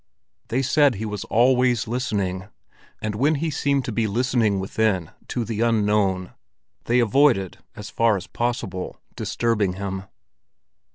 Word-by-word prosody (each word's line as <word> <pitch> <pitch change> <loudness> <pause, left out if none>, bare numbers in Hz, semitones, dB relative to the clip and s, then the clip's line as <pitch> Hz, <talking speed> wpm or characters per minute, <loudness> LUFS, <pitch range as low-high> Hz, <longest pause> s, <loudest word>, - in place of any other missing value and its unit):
They 130 +4 0
said 140 -1 +3
he 110 +3 -4
was 105 -2 -4
always 125 0 +3
listening; 100 -6 -2 0.6
and 110 -1 -1
when 140 +9 +2
he 155 +2 -1
seemed 140 -2 0
to - - -3
be 110 0 0
listening 115 -2 +1
within 95 -3 0 0.2
to 120 - -2
the 110 0 -3
unknown, 105 -5 +1 0.5
they 120 - +2
avoided 120 -4 +3 0.2
as 105 -1 -8
far 115 -3 +3
as 90 - -7
possible 120 -6 -3 0.2
disturbing 110 -5 0
him. 95 0 -5
110 Hz, 135 wpm, -23 LUFS, 100-125 Hz, 0.6 s, said